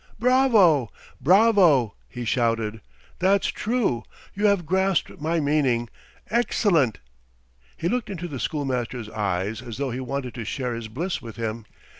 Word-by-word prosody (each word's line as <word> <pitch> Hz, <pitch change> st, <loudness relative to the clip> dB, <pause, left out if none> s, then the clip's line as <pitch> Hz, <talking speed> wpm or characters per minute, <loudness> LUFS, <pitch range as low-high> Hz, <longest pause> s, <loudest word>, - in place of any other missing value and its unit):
"Bravo! 220 Hz, -, +4 dB, 0.3 s
bravo!" 180 Hz, -, +5 dB, 0.2 s
he 125 Hz, -1 st, -6 dB
shouted. 115 Hz, -2 st, 0 dB, 0.4 s
"That's 195 Hz, +2 st, +3 dB
true! 215 Hz, -, 0 dB, 0.3 s
You 205 Hz, +1 st, +2 dB
have 200 Hz, -4 st, +2 dB
grasped 190 Hz, -2 st, 0 dB
my 165 Hz, +2 st, 0 dB
meaning!... 140 Hz, -6 st, +1 dB, 0.4 s
Excellent!.. 195 Hz, -, +2 dB, 0.4 s
." -, -, -38 dB, 0.3 s
He 165 Hz, -, -2 dB
looked 245 Hz, +4 st, -1 dB
into 175 Hz, -3 st, -5 dB
the 140 Hz, -6 st, -6 dB
schoolmaster's 125 Hz, -4 st, -3 dB
eyes 100 Hz, +1 st, -2 dB
as 120 Hz, -3 st, -8 dB
though 140 Hz, -2 st, -2 dB
he 125 Hz, -, -4 dB
wanted 130 Hz, -1 st, -4 dB
to 120 Hz, -, -5 dB
share 125 Hz, +3 st, -3 dB
his 115 Hz, -1 st, -5 dB
bliss 165 Hz, -, -3 dB
with 115 Hz, -3 st, -9 dB
him. 115 Hz, -1 st, -4 dB
140 Hz, 145 wpm, -24 LUFS, 115-190 Hz, 0.4 s, bravo